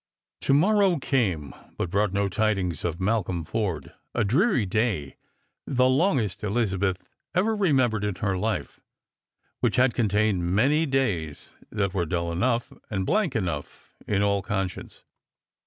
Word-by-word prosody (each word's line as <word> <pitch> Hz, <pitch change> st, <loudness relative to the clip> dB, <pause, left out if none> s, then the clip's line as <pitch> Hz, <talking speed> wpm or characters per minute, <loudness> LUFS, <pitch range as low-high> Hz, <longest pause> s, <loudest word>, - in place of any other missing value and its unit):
To 135 Hz, -, +3 dB
morrow 195 Hz, +3 st, +4 dB
came, 100 Hz, -, 0 dB, 0.2 s
but 85 Hz, -, -2 dB
brought 100 Hz, 0 st, +1 dB
no 100 Hz, +1 st, +1 dB
tidings 95 Hz, -5 st, 0 dB
of 85 Hz, -2 st, -1 dB
i\ralcolm 95 Hz, -3 st, -1 dB
Forde 90 Hz, -11 st, -3 dB
— -, -, -35 dB
a 120 Hz, -, +2 dB
dreary 130 Hz, -, +2 dB
day, 95 Hz, -, -1 dB, 0.5 s
the 130 Hz, -2 st, +3 dB
longest 130 Hz, -, +1 dB
Elizabeth 100 Hz, -3 st, 0 dB, 0.4 s
ever 215 Hz, +5 st, +2 dB
remembered 130 Hz, -, +2 dB
in 105 Hz, -2 st, -1 dB
her 95 Hz, 0 st, -1 dB
life 105 Hz, +4 st, -2 dB, 0.4 s
— -, -, -48 dB
which -, -, +2 dB
had 125 Hz, -1 st, +4 dB
contained 105 Hz, -4 st, +1 dB
many 150 Hz, +9 st, +3 dB
days 100 Hz, -, -2 dB, 0.2 s
that 100 Hz, -3 st, -1 dB
were 90 Hz, -4 st, -1 dB
dull 85 Hz, -1 st, -1 dB
enough 115 Hz, +7 st, 0 dB, 0.2 s
and 95 Hz, -3 st, -2 dB
Hank 205 Hz, -8 st, +1 dB
enough 85 Hz, -9 st, -4 dB
in 100 Hz, -1 st, +1 dB
all 100 Hz, -1 st, +2 dB
conscience. 95 Hz, -2 st, -4 dB
105 Hz, 145 wpm, -26 LUFS, 95-130 Hz, 0.5 s, morrow